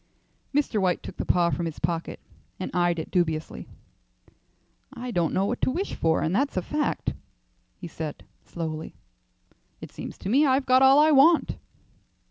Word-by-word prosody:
Mr. 275 Hz, -7 st, 0 dB
White 180 Hz, -2 st, 0 dB
took -, -, -9 dB
the -, -, -4 dB
paw 175 Hz, -1 st, +3 dB
from 170 Hz, -1 st, -2 dB
his 160 Hz, -, -7 dB
pocket 165 Hz, +1 st, -3 dB, 0.4 s
and 185 Hz, -, -4 dB
eyed 175 Hz, -1 st, +1 dB
it 160 Hz, -, -5 dB
dubiously. 160 Hz, -4 st, -1 dB, 1.2 s
"I 250 Hz, -2 st, -6 dB
don't 170 Hz, -6 st, 0 dB
know 190 Hz, -, +1 dB
what 240 Hz, +4 st, -3 dB
to -, -, +2 dB
wish 360 Hz, +9 st, -3 dB
for, 160 Hz, -1 st, +1 dB
and 160 Hz, -, -1 dB
that's 275 Hz, -2 st, 0 dB
a 185 Hz, -, 0 dB
fact," 295 Hz, -, -2 dB, 0.6 s
he 175 Hz, -, -8 dB
said, 155 Hz, -2 st, -7 dB, 0.2 s
slowly. 160 Hz, -2 st, -6 dB, 0.8 s
"It -, -, -10 dB
seems -, -, -8 dB
to 190 Hz, -, -6 dB
me 270 Hz, +7 st, +4 dB
I've 265 Hz, -1 st, +2 dB
got 255 Hz, 0 st, +4 dB
all 265 Hz, +1 st, +7 dB
I 305 Hz, +1 st, +5 dB
want." 305 Hz, +4 st, +4 dB
185 Hz, 170 wpm, -25 LUFS, 170-270 Hz, 1.2 s, all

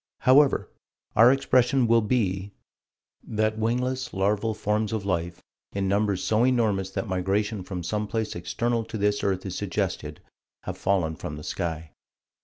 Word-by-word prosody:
However, 135 Hz, +2 st, +5 dB, 0.5 s
our 115 Hz, +3 st, +8 dB
expression 130 Hz, -1 st, +3 dB
will 115 Hz, 0 st, +4 dB
be: 100 Hz, -4 st, -1 dB, 0.7 s
That 110 Hz, 0 st, -1 dB
wingless, 125 Hz, +3 st, -1 dB
larval 105 Hz, +3 st, +1 dB
forms 105 Hz, +1 st, -1 dB
of 105 Hz, -3 st, -2 dB
life, 85 Hz, -2 st, -2 dB, 0.3 s
in 100 Hz, -1 st, -1 dB
numbers 100 Hz, -1 st, +1 dB
so 110 Hz, +2 st, +2 dB
enormous 110 Hz, -7 st, +2 dB
that 105 Hz, -, -4 dB
migration 100 Hz, +3 st, -1 dB
from 90 Hz, -1 st, -5 dB
some 105 Hz, +5 st, -2 dB
place 110 Hz, 0 st, -2 dB
external 115 Hz, +7 st, -1 dB
to 110 Hz, -, -6 dB
this 105 Hz, 0 st, +1 dB
earth 95 Hz, -1 st, 0 dB
is 95 Hz, -1 st, -4 dB
suggested, -, -, -3 dB, 0.4 s
have -, -, -5 dB
fallen 90 Hz, -5 st, +1 dB
from 75 Hz, -, -6 dB
the 75 Hz, -, -9 dB
sky. 80 Hz, -2 st, -4 dB
105 Hz, 150 wpm, -26 LUFS, 95-115 Hz, 0.7 s, our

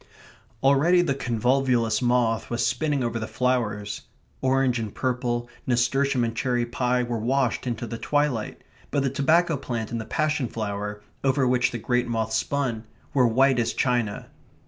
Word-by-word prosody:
Already 150 Hz, +7 st, +4 dB
the 145 Hz, -6 st, +1 dB
convolvulus 125 Hz, -2 st, +1 dB
moth 120 Hz, -2 st, +1 dB
was 120 Hz, -, 0 dB
spinning 140 Hz, +3 st, 0 dB
over 115 Hz, -1 st, -2 dB
the 110 Hz, -, -4 dB
flowers. 110 Hz, -5 st, -1 dB, 0.4 s
Orange 130 Hz, -2 st, +2 dB
and 110 Hz, -3 st, -5 dB
purple, 120 Hz, -2 st, -1 dB, 0.2 s
nasturtium 130 Hz, +1 st, +2 dB
and 115 Hz, -1 st, -2 dB
cherry 120 Hz, 0 st, 0 dB
pie, 125 Hz, +1 st, 0 dB
were 120 Hz, -1 st, -2 dB
washed 130 Hz, +2 st, 0 dB
into 120 Hz, -1 st, -3 dB
the 115 Hz, 0 st, -6 dB
twilight, 145 Hz, -7 st, -1 dB, 0.3 s
but 140 Hz, -2 st, 0 dB
the 135 Hz, -, 0 dB
tobacco 160 Hz, +3 st, +2 dB
plant 115 Hz, -4 st, -4 dB
and 115 Hz, -1 st, -2 dB
the -, -, -7 dB
passion 150 Hz, +1 st, 0 dB
flower, 105 Hz, -1 st, -4 dB, 0.2 s
over 135 Hz, -1 st, +2 dB
which 125 Hz, 0 st, +2 dB
the 120 Hz, -, -4 dB
great 125 Hz, +2 st, 0 dB
moth 110 Hz, -1 st, -1 dB
spun, 115 Hz, -1 st, -1 dB, 0.3 s
were 130 Hz, -4 st, +4 dB
white 130 Hz, +2 st, +3 dB
as 115 Hz, -1 st, 0 dB
china. 120 Hz, -5 st, 0 dB
125 Hz, 160 wpm, -25 LUFS, 115-135 Hz, 0.4 s, Already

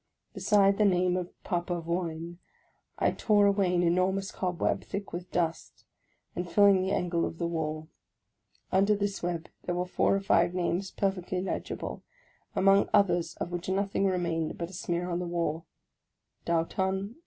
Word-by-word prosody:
Beside 200 Hz, -1 st, +3 dB
the -, -, +5 dB
name 180 Hz, -2 st, +3 dB
of 180 Hz, -1 st, -2 dB
Papavoine, 170 Hz, -1 st, -3 dB, 0.6 s
I -, -, +2 dB
tore 210 Hz, -2 st, +3 dB
away 195 Hz, -3 st, +2 dB
an 175 Hz, -, +2 dB
enormous 185 Hz, +3 st, +1 dB
cobweb, 180 Hz, -2 st, -1 dB
thick 200 Hz, 0 st, -6 dB
with 175 Hz, +1 st, -5 dB
dust, 165 Hz, -2 st, -2 dB, 0.5 s
and 175 Hz, 0 st, -3 dB
filling 200 Hz, +1 st, +5 dB
the 190 Hz, -, -1 dB
angle 175 Hz, -2 st, 0 dB
of 165 Hz, -, -3 dB
the 170 Hz, -, -2 dB
wall. 155 Hz, -2 st, -3 dB, 0.8 s
Under 200 Hz, +3 st, +4 dB
this 200 Hz, -1 st, -2 dB
web 170 Hz, -2 st, -3 dB, 0.2 s
there 175 Hz, -, -1 dB
were 180 Hz, 0 st, -1 dB
four 180 Hz, -, +2 dB
or -, -, +1 dB
five 175 Hz, -2 st, +2 dB
names 185 Hz, +2 st, -1 dB
perfectly 185 Hz, -2 st, -2 dB
legible, 185 Hz, -, -4 dB, 0.5 s
among 195 Hz, +1 st, +4 dB
others 175 Hz, -5 st, +2 dB
of 175 Hz, -, -5 dB
which 175 Hz, +1 st, -4 dB
nothing 195 Hz, +1 st, +1 dB
remained 170 Hz, -4 st, -1 dB
but 170 Hz, +1 st, -5 dB
a -, -, -14 dB
smear 175 Hz, -1 st, -2 dB
on 175 Hz, -1 st, -1 dB
the 180 Hz, -, -3 dB
wall, 170 Hz, -2 st, -2 dB, 0.4 s
— -, -, -49 dB
DAUTAN, 165 Hz, -1 st, +2 dB, 0.2 s
1815. 195 Hz, +6 st, -2 dB
180 Hz, 165 wpm, -29 LUFS, 170-195 Hz, 0.8 s, the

